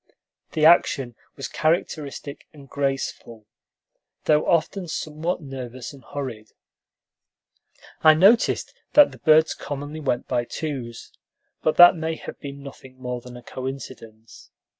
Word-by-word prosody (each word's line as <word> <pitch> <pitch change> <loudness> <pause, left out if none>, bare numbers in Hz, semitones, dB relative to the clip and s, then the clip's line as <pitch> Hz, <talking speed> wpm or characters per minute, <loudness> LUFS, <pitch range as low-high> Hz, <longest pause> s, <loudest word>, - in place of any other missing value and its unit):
The 155 - +2
action 135 -7 +4 0.2
was 135 - -5
characteristic 155 -3 -2
and 140 -2 -15
graceful, 135 -5 -3 0.8
though 150 0 +2
often 175 +3 +1
somewhat 160 +2 -3
nervous 130 -2 -7
and 135 - -15
hurried. 125 -7 -7 1.5
I 155 0 +8
noticed 200 +8 +3 0.2
that 295 -1 +7
the - - -14
birds 155 0 +4
commonly 145 +2 -6
went 130 -5 -2
by 120 - 0
twos, 130 -6 -6 0.5
but 155 - 0
that 175 0 +9
may 160 0 -3
have - - -9
been 140 -1 -8
nothing 130 -2 -12
more 125 -1 -4
than 125 0 -11
a 120 - -13
coincidence. 130 -4 -9
140 Hz, 125 wpm, -23 LUFS, 125-155 Hz, 1.5 s, that